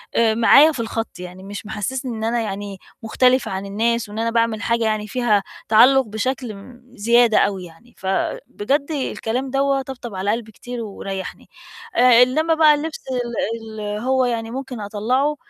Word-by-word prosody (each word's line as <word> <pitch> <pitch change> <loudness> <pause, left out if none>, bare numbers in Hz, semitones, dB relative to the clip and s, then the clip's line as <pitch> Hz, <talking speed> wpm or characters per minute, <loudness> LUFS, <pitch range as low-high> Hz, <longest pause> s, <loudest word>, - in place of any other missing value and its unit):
آآ، 225 -1 +3
معايا 280 +7 +6
في 265 - -7
الخط، 225 -3 -4
يعني 180 +1 -9
مش 205 +2 -8
محسِّسني 230 +3 -4
إن 220 - -5
أنا 235 +1 0
يعني 200 -2 -5 0.3
مختلفة 250 +2 +2
عن 190 +1 -4
الناس، 225 +2 -1
وإن 210 - -6
أنا 230 0 0
باعمل 230 -1 0
حاجة 235 0 0
يعني 215 -1 -1
فيها 215 -4 +1 0.3
تعلُّق 255 +5 +6
بشكل 225 +2 -3
م 240 +5 -14
زيادة 235 +1 +4
أوي 190 -3 +1
يعني، 175 +9 -17
فبجد 205 +7 -2
الكلام 260 -3 -2
دَوَّة 275 0 +1
طَبطَب 245 -5 -8
على 195 +2 0
قلبي 225 -1 -4
كتير 245 +2 -7
وريّحني، 195 -3 -7 0.5
آآ، 245 0 +7
إنّما 315 +6 +1
بقى 310 -1 +6
الِلبس 310 +2 -5
ال 230 -3 -3
ال 210 0 -3
هو 260 0 +2
يعني 230 -1 -2
ممكن 260 -2 -6
أطلّعُه، 250 +9 0
230 Hz, 165 wpm, -21 LUFS, 210-255 Hz, 0.5 s, آآ